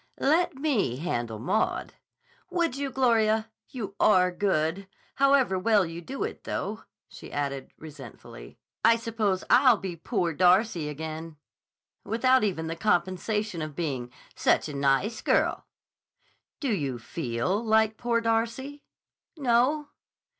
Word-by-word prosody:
"Let 340 Hz, +4 st, +2 dB
me 265 Hz, -, 0 dB
handle 120 Hz, -7 st, -3 dB
Maud." 130 Hz, -, -1 dB, 0.6 s
"Would 340 Hz, -7 st, 0 dB
you, 280 Hz, 0 st, -2 dB
Gloria? 225 Hz, -4 st, +2 dB, 0.2 s
You 225 Hz, -8 st, -6 dB
are 185 Hz, -3 st, +4 dB
good. 180 Hz, 0 st, 0 dB, 0.3 s
However 275 Hz, -8 st, +3 dB
well 210 Hz, -1 st, +3 dB
you 165 Hz, +1 st, -7 dB
do 270 Hz, +10 st, -5 dB
it, -, -, -5 dB
though," -, -, -4 dB, 0.2 s
she -, -, -12 dB
added 140 Hz, -2 st, -3 dB
resentfully, 135 Hz, -, -12 dB, 0.3 s
"I 230 Hz, -, +6 dB
suppose 220 Hz, -4 st, -1 dB
I'll 250 Hz, -2 st, +6 dB
be 190 Hz, -3 st, -5 dB
'Poor 175 Hz, 0 st, -1 dB
Darcy' 180 Hz, -1 st, +3 dB
again 160 Hz, +1 st, -6 dB, 0.7 s
without 255 Hz, +4 st, +3 dB
even 175 Hz, -6 st, -1 dB
the 165 Hz, +1 st, -3 dB
compensation 185 Hz, +1 st, 0 dB
of 155 Hz, -2 st, -5 dB
being 135 Hz, -8 st, -3 dB, 0.2 s
'Such -, -, +2 dB
a 150 Hz, -, -6 dB
nice 140 Hz, -, +1 dB
girl.'" -, -, +1 dB, 0.9 s
"Do 275 Hz, -5 st, -1 dB
you 140 Hz, -9 st, -2 dB
feel 125 Hz, -, -2 dB
like 220 Hz, -1 st, +2 dB
'Poor 235 Hz, -1 st, 0 dB
Darcy'?" 230 Hz, +5 st, -1 dB, 0.5 s
"No." 280 Hz, +3 st, +2 dB
200 Hz, 125 wpm, -27 LUFS, 160-235 Hz, 0.9 s, I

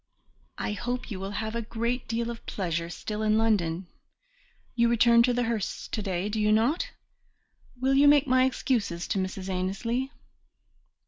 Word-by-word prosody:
I -, -, -2 dB
hope 245 Hz, +3 st, -4 dB
you 195 Hz, -, -4 dB
will 195 Hz, +1 st, -4 dB, 0.2 s
have 225 Hz, +1 st, -4 dB
great 235 Hz, +2 st, -2 dB
deal 230 Hz, +1 st, -1 dB
of 230 Hz, -, -9 dB
pleasure 170 Hz, -3 st, -2 dB
still 210 Hz, +4 st, -5 dB
in 215 Hz, 0 st, +3 dB
London. 190 Hz, -6 st, +1 dB, 0.9 s
You 235 Hz, -1 st, +3 dB
return 235 Hz, 0 st, +5 dB
to 250 Hz, +1 st, +3 dB
the 245 Hz, 0 st, +1 dB
Hursts 225 Hz, -3 st, -2 dB
to 215 Hz, -, -3 dB
day, 190 Hz, -1 st, -2 dB
do 215 Hz, +1 st, -2 dB
you 210 Hz, 0 st, +3 dB
not? 230 Hz, +10 st, +2 dB, 0.9 s
Will 265 Hz, +2 st, +2 dB
you 280 Hz, +1 st, +6 dB
make 290 Hz, 0 st, +6 dB
my 255 Hz, -1 st, +4 dB
excuses 225 Hz, -9 st, -1 dB
to 195 Hz, -, 0 dB
Mrs. 185 Hz, 0 st, -4 dB
Annesley?" 195 Hz, +8 st, -1 dB
225 Hz, 160 wpm, -27 LUFS, 195-245 Hz, 0.9 s, you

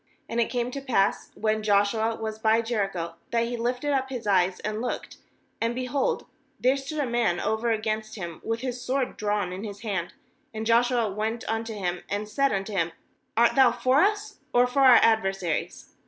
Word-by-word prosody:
wAnd 235 Hz, +1 st, 0 dB
it 230 Hz, -, 0 dB
came 245 Hz, 0 st, -1 dB
to 275 Hz, -, -5 dB
pass, 225 Hz, -7 st, +1 dB
when 215 Hz, 0 st, 0 dB
Joshua 215 Hz, +2 st, +2 dB
was 220 Hz, -1 st, -5 dB
by 220 Hz, +1 st, +3 dB
Jericho, 195 Hz, -8 st, -2 dB
that 230 Hz, -1 st, +1 dB
he 240 Hz, +1 st, -3 dB
lifted 250 Hz, +5 st, -1 dB
up 265 Hz, -1 st, 0 dB
his 250 Hz, -4 st, -5 dB
eyes 185 Hz, -2 st, +2 dB
and 215 Hz, +1 st, -3 dB
looked, 245 Hz, -, -4 dB, 0.4 s
and, 230 Hz, +1 st, 0 dB
behold, 255 Hz, +2 st, -1 dB, 0.3 s
there 255 Hz, +2 st, +3 dB
stood 280 Hz, +3 st, -5 dB
a 290 Hz, -, +1 dB
man 235 Hz, -8 st, +1 dB
over 220 Hz, +2 st, 0 dB
against 215 Hz, -1 st, -1 dB
him 170 Hz, -5 st, -7 dB
with 225 Hz, +1 st, -2 dB
his 250 Hz, -1 st, -4 dB
sword 255 Hz, +1 st, -1 dB
drawn 205 Hz, -3 st, -1 dB
in 190 Hz, +3 st, -6 dB
his 205 Hz, -2 st, -7 dB
hand; 195 Hz, -6 st, -3 dB, 0.4 s
and 220 Hz, 0 st, -3 dB
Joshua 235 Hz, -1 st, +3 dB
went 220 Hz, +3 st, -3 dB
unto 225 Hz, 0 st, -2 dB
him, 180 Hz, -3 st, -2 dB
and 205 Hz, +1 st, -2 dB
said 275 Hz, +6 st, +1 dB
unto 195 Hz, +2 st, -2 dB
him: 170 Hz, -3 st, 0 dB, 0.4 s
'Art 235 Hz, +1 st, +5 dB
thou 265 Hz, -3 st, +6 dB
for 255 Hz, +4 st, +3 dB
us, 415 Hz, +1 st, 0 dB, 0.2 s
or 245 Hz, 0 st, +6 dB
for 250 Hz, +2 st, -1 dB
our 260 Hz, -3 st, +8 dB
ad 220 Hz, -1 st, +5 dB
versaries?' 195 Hz, -4 st, -3 dB
225 Hz, 195 wpm, -26 LUFS, 205-250 Hz, 0.4 s, our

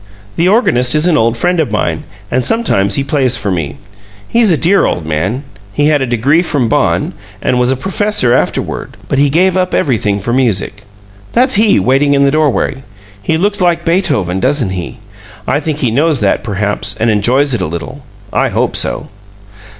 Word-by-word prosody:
The 170 Hz, -, +1 dB
organist 140 Hz, -, +2 dB
is 150 Hz, +2 st, +2 dB
an 175 Hz, -3 st, +3 dB
old 115 Hz, -3 st, +1 dB
friend 175 Hz, +5 st, 0 dB
of 155 Hz, -6 st, 0 dB
mine, 85 Hz, -6 st, -2 dB, 0.3 s
and 130 Hz, 0 st, +1 dB
sometimes 100 Hz, -, +1 dB
he 140 Hz, -, 0 dB
plays 135 Hz, -3 st, +1 dB
for 100 Hz, -, -2 dB
me. 75 Hz, -6 st, -3 dB, 0.5 s
He's 230 Hz, -2 st, +3 dB
a 165 Hz, -, +3 dB
dear 190 Hz, +6 st, +3 dB
old 85 Hz, -, -3 dB
man. 90 Hz, -, -2 dB, 0.3 s
He 145 Hz, +1 st, +2 dB
had 150 Hz, -2 st, +2 dB
a 130 Hz, -, -1 dB
degree 130 Hz, +7 st, +2 dB
from 145 Hz, -8 st, -1 dB
Bonn, -, -, 0 dB, 0.3 s
and 125 Hz, -, 0 dB
was 125 Hz, +1 st, +2 dB
a -, -, +1 dB
professor 190 Hz, -, 0 dB
afterward, 130 Hz, -, -2 dB
but 135 Hz, -, 0 dB
he 145 Hz, 0 st, +3 dB
gave 180 Hz, +5 st, +2 dB
up 185 Hz, -1 st, 0 dB
everything 105 Hz, -7 st, 0 dB
for 120 Hz, +5 st, -3 dB
music. 105 Hz, -4 st, -1 dB, 0.5 s
That's 255 Hz, +2 st, +3 dB
he, 215 Hz, 0 st, +4 dB
waiting 140 Hz, +2 st, +2 dB
in 140 Hz, 0 st, +3 dB
the 140 Hz, -, +2 dB
doorway. 150 Hz, -3 st, 0 dB, 0.4 s
He 160 Hz, +9 st, 0 dB
looks 200 Hz, +3 st, 0 dB
like 170 Hz, -1 st, +1 dB
Beethoven, 145 Hz, -, 0 dB
doesn't 130 Hz, -4 st, 0 dB
he? 90 Hz, -2 st, -5 dB, 0.5 s
I 145 Hz, -, 0 dB
think 155 Hz, -1 st, -3 dB
he 130 Hz, -6 st, 0 dB
knows 145 Hz, +3 st, +2 dB
that, 100 Hz, -, +1 dB
perhaps 100 Hz, -3 st, -2 dB
and 115 Hz, 0 st, +2 dB
enjoys 125 Hz, +7 st, +2 dB
it 115 Hz, -, -1 dB
a 90 Hz, -, -1 dB
little. 85 Hz, -, -7 dB, 0.3 s
I -, -, +1 dB
hope -, -, -1 dB
so." -, -, -1 dB
135 Hz, 190 wpm, -13 LUFS, 105-165 Hz, 0.5 s, he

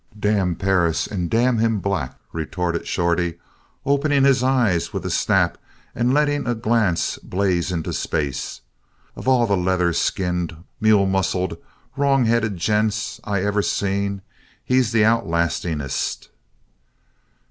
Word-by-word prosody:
"Damn 100 Hz, -4 st, +1 dB
Perris 90 Hz, -3 st, +1 dB
and 90 Hz, -4 st, -3 dB
damn 120 Hz, +1 st, +2 dB
him 115 Hz, -1 st, +2 dB
black," 95 Hz, -9 st, -2 dB, 0.2 s
retorted 85 Hz, +1 st, -3 dB
Shorty, 85 Hz, -1 st, 0 dB, 0.5 s
opening 140 Hz, 0 st, +2 dB
his 135 Hz, -2 st, +4 dB
eyes 125 Hz, -10 st, +1 dB
with -, -, -5 dB
a -, -, -2 dB
snap -, -, +1 dB, 0.3 s
and 120 Hz, +1 st, +1 dB
letting 145 Hz, -1 st, +1 dB
a 120 Hz, -, +1 dB
glance 110 Hz, -6 st, 0 dB
blaze 90 Hz, -2 st, -1 dB
into 85 Hz, -3 st, -3 dB
space. 70 Hz, -2 st, -3 dB, 0.5 s
"Of -, -, -8 dB
all 130 Hz, -2 st, +4 dB
the 100 Hz, -3 st, +1 dB
leather 90 Hz, -1 st, +1 dB
skinned, 90 Hz, -2 st, -1 dB, 0.2 s
mule 105 Hz, -2 st, +4 dB
muscled, 95 Hz, -2 st, 0 dB, 0.4 s
wrong 140 Hz, -2 st, +2 dB
headed 110 Hz, -3 st, +1 dB
gents 105 Hz, +3 st, 0 dB
I 100 Hz, -2 st, -1 dB
ever 105 Hz, 0 st, +1 dB
seen 100 Hz, -1 st, -1 dB, 0.4 s
he's 125 Hz, -3 st, +2 dB
the 115 Hz, -2 st, +3 dB
outlastingest." 85 Hz, -, -1 dB
100 Hz, 125 wpm, -22 LUFS, 90-115 Hz, 0.5 s, his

